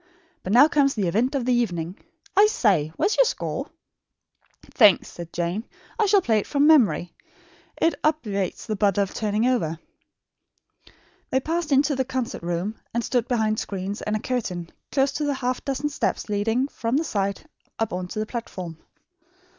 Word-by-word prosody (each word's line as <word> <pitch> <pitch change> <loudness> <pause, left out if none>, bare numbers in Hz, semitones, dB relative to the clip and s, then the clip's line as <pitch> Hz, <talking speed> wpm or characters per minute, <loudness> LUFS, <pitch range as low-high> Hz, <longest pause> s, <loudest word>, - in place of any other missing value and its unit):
But 185 - -4
now 255 +7 +8
comes 280 -3 +2
the 200 -5 0
event 235 - +1
of 260 -4 -1
the 250 - +2
evening. 180 -7 -1 0.4
I 410 +2 +7
say, 190 - +2
where - - 0
is 425 - +2
your - - +7
score?" - - -3 1.0
"Thanks," 210 -6 +5
said 170 -1 -9
Jane. 175 +5 -2 0.4
"I 435 - +3
shall 400 -2 +4
play 220 -2 +3
it - - -5
from 285 0 +2
memory. 250 - +4 0.7
It 330 - +3
obviates 215 - -1
the 215 - -2
bother 200 -1 +2
of 195 - -6
turning 215 +1 0
over." 225 -11 +1 1.5
They 260 - +2
passed 325 +2 -2
into 285 +2 +3
the 265 - +1
concert 255 -2 -3
room 175 +5 -3 0.2
and 235 - +1
stood 245 -1 0
behind 220 -3 +1
screens 195 +1 -4
and 210 - -1
a - - 0
curtain, 185 -9 -3 0.2
close 275 0 +2
to 300 - -3
the 290 -1 0
half 255 -1 -2
dozen 275 +2 -2
steps 285 - -2
leading, 225 +6 +1
from 235 0 -1
the 315 - +1
side, 200 - -2 0.3
up 225 -4 -1
on 180 0 -3
to 215 - -8
the 215 - 0
platform. 185 -8 -6
225 Hz, 180 wpm, -24 LUFS, 195-275 Hz, 1.5 s, now